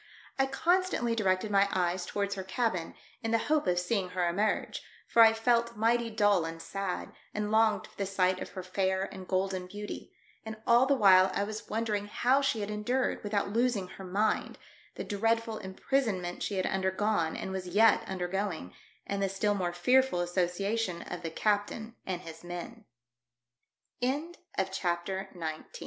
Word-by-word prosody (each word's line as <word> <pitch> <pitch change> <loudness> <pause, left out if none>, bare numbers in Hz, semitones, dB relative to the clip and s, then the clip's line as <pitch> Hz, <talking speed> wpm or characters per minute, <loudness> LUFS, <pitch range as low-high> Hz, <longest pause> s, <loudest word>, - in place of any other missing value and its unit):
I 270 - +4
constantly 345 -5 +1
directed 195 -1 +1
my 200 0 +4
eyes 180 -1 0
towards 200 -1 -1
her 195 - -4
cabin, 190 -3 -1 0.3
in 225 - -2
the 230 - +3
hope 300 +3 +1
of 180 -1 +2
seeing 180 +1 0
her 180 -1 0
emerge, 200 +5 0 0.3
for 230 - +5
I 225 -1 +9
felt 235 0 +1
mighty 230 +2 +2
dull 205 -5 +3
and 165 0 -5
sad, 195 +2 -4 0.2
and 210 0 -1
longed 220 -1 +3
for - - -19
the 200 - -1
sight 185 -1 +1
of - - -5
her 185 - -5
fair 190 +1 0
and 190 -1 -9
golden 185 -1 -1
beauty; 205 +2 -7 0.3
and 220 0 -6
all 240 +3 +5
the 280 - +4
while 190 -5 +6
I 200 - +1
was 215 +1 -6
wondering 215 -2 -1
how 255 +6 +2
she 270 -6 0
had 205 +1 -3
endured, 245 +6 -1
without 205 -1 0
losing 230 -5 +1
her 195 - -10
mind, 200 +4 0 0.4
the - - -4
dread 225 +3 +1
ful 225 -1 -5
imprisonment 190 -2 -1
she 205 - -2
had 185 - 0
undergone 190 -2 0
and 190 - -4
was 190 -1 -4
yet 210 +5 +5
undergoing, 185 - -3 0.3
and 200 0 -2
the 195 - +1
still 205 +2 +1
more 180 -3 -1
fea 250 +10 +4
205 Hz, 150 wpm, -30 LUFS, 185-225 Hz, 0.4 s, I